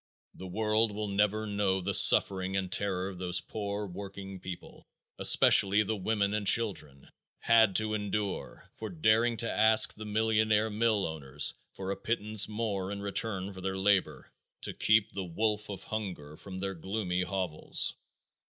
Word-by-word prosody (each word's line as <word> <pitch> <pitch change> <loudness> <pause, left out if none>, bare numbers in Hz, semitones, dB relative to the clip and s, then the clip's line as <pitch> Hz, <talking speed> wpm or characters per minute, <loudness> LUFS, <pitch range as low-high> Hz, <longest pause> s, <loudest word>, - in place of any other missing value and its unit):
The 95 - -10
world 110 +3 0
will 105 0 -5
never 105 +2 0
know 100 -2 -1
the 95 +2 -3
suffering 95 -1 +6
and 95 -1 -3
terror 95 -1 -2
these 90 0 -2
poor 100 +1 -5
working 95 0 -9
people 90 -1 -10 0.3
especially 100 +2 +6
the 110 +2 -3
women 100 0 -1
and 105 -2 -2
children 80 -13 0 0.3
had 110 -4 +3
to 110 0 +1
endure 105 -1 -5
for 110 - -6
daring 110 +7 +1
to 115 - -2
ask 110 0 +5
the 110 - -10
millionaire 110 0 +1
mill 110 -1 0
owners 75 -3 -3 0.2
for 95 0 -5
a - - -2
pittance 110 -1 -1
more 105 -3 -3
in 100 0 -6
return 100 -1 -2
for 95 - -10
their 95 0 -3
labor 95 0 0 0.3
to - - -3
keep 110 -1 +2
the 95 - -5
wolf 105 +4 -2
of 100 - -7
hunger 90 -9 -6
from 95 +3 -10
their 95 +1 -4
gloomy 95 0 -3
hovels. 90 -3 -1
100 Hz, 155 wpm, -29 LUFS, 95-110 Hz, 0.3 s, suffering